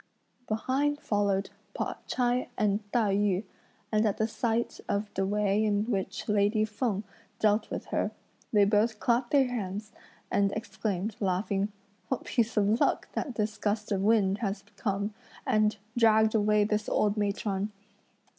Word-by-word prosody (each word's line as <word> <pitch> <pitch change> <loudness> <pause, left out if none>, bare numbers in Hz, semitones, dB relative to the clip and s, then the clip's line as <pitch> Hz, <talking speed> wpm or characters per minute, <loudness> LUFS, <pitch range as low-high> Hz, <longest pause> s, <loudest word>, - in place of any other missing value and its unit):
Behind 270 +7 0
followed 200 -4 0 0.2
Pao - - -2
ch'ai 245 0 0
and 205 -2 +2
Tai 215 -5 +2
yü, 200 -1 +2 0.5
and 215 0 +3
at 205 - 0
the 220 - +1
sight 230 +1 -1
of 205 +1 -1
the 195 0 0
way 205 +1 +2
in 205 -1 +2
which 195 -1 -2
lady 210 +1 +3
Feng 210 -1 -2 0.3
dealt 215 0 +2
with - - -4
her, - - +1 0.4
they 205 -2 +5
both 210 +2 +2
clapped 240 0 +1
their 275 -2 +4
hands, 210 -2 -4 0.4
and 200 -1 +3
exclaimed, 215 -2 -3
laughing, 195 +1 0 0.4
"What 260 - -2
piece 230 -2 0
of 210 +3 +3
luck - - +2
that 255 - -3
this 215 0 -2
gust 210 +1 -1
of 195 -2 +1
wind 200 -2 +3
has 200 -3 -2
come, 205 0 -2 0.3
and 215 0 +2 0.2
dragged 220 -2 +5
away 210 -1 +3
this 210 0 0
old 205 -1 +2
matron!" 205 -1 -1
210 Hz, 150 wpm, -29 LUFS, 200-220 Hz, 0.5 s, they